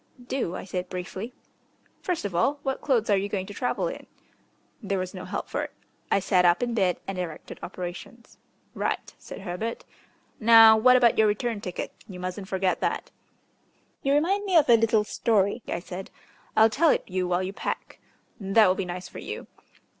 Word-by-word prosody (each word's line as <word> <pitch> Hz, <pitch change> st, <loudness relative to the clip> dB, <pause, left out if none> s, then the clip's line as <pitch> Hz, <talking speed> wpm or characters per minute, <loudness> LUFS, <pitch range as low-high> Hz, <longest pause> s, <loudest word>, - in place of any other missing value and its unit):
"Do," 245 Hz, -9 st, -2 dB
I -, -, -5 dB
said 180 Hz, -1 st, -4 dB
briefly. 185 Hz, +5 st, -5 dB, 0.7 s
"First 355 Hz, -, -2 dB
of 200 Hz, -, -3 dB
all, 270 Hz, +12 st, +2 dB
what 270 Hz, -1 st, -2 dB
clothes 235 Hz, -6 st, +1 dB
are -, -, +6 dB
you 200 Hz, +1 st, -2 dB
going 190 Hz, -2 st, -2 dB
to 205 Hz, -, -9 dB
travel 250 Hz, -, -1 dB
in?" -, -, -7 dB, 0.7 s
There 200 Hz, -3 st, -1 dB
was 185 Hz, 0 st, -3 dB
no -, -, -7 dB
help -, -, -4 dB
for -, -, -2 dB
it. -, -, -6 dB, 0.4 s
I -, -, +4 dB
sat 185 Hz, -1 st, +2 dB
up 175 Hz, +6 st, +4 dB
in 240 Hz, -1 st, -1 dB
bed 190 Hz, -6 st, +1 dB
and 195 Hz, -1 st, -4 dB
directed 165 Hz, -4 st, -6 dB
operations. 180 Hz, +6 st, -8 dB, 0.3 s
"Right," -, -, -3 dB
said -, -, -9 dB
Herbert. 200 Hz, +6 st, -4 dB, 0.5 s
"Now 225 Hz, 0 st, +8 dB
what 250 Hz, +4 st, +6 dB
about 240 Hz, -3 st, +4 dB
your 220 Hz, -, +6 dB
return 210 Hz, +1 st, -1 dB
ticket? 180 Hz, -3 st, -5 dB
You 185 Hz, -3 st, -9 dB
mustn't 185 Hz, +2 st, -5 dB
forget 190 Hz, -1 st, 0 dB
that." -, -, -2 dB, 0.9 s
"You 275 Hz, -, +1 dB
remind 365 Hz, +8 st, +2 dB
me 375 Hz, -3 st, +3 dB
of 305 Hz, -, +5 dB
a 235 Hz, -, +9 dB
little 225 Hz, -1 st, +3 dB
story," 210 Hz, 0 st, +1 dB
I -, -, -2 dB
said. 185 Hz, +1 st, -8 dB, 0.5 s
"I'll 220 Hz, 0 st, +6 dB
tell 315 Hz, +8 st, +3 dB
it -, -, +2 dB
you 185 Hz, -1 st, -2 dB
while 180 Hz, +1 st, +1 dB
you 190 Hz, +1 st, -4 dB
pack -, -, -5 dB, 0.4 s
that 200 Hz, +2 st, +4 dB
will 185 Hz, -, +4 dB
be 190 Hz, 0 st, -3 dB
nice 180 Hz, +1 st, -6 dB
for -, -, -10 dB
you. -, -, -6 dB
205 Hz, 190 wpm, -26 LUFS, 185-235 Hz, 0.9 s, a